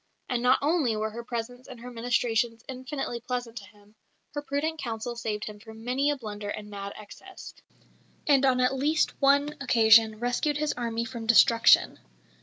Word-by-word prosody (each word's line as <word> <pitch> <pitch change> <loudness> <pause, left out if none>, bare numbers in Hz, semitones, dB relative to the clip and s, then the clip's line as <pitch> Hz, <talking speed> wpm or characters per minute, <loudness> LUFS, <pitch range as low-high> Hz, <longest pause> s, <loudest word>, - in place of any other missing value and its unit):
And 245 -2 -1
not 250 +1 +4
only 290 -7 +1
were 215 0 -2
her 235 +2 -7
presence 245 +1 -6
and 250 - -11
her 250 +1 -9
ministrations 230 -1 -1
infinitely 260 -1 -5
pleasant 245 -1 -5
to 205 - -7
him; 205 0 -22 0.4
her 290 - -3
prudent 290 +3 -3
counsel 235 -1 -4
saved 215 -3 -4
him 210 -1 -9
from 220 +1 -13
many 265 +4 +1
a 290 - +1
blunder 210 -4 -7
and 210 0 -7
mad 200 0 -6
excess, 300 - -12 0.7
and 280 -3 +4
on 260 -2 +3
at 250 +1 +2
least 295 +4 +1
one 285 +2 +3
occasion 225 -3 +5
rescued 245 +5 -1
his 300 0 -1
army 230 -1 -3
from 235 -2 -7
destruction. 230 0 +5
240 Hz, 175 wpm, -27 LUFS, 225-270 Hz, 0.7 s, occasion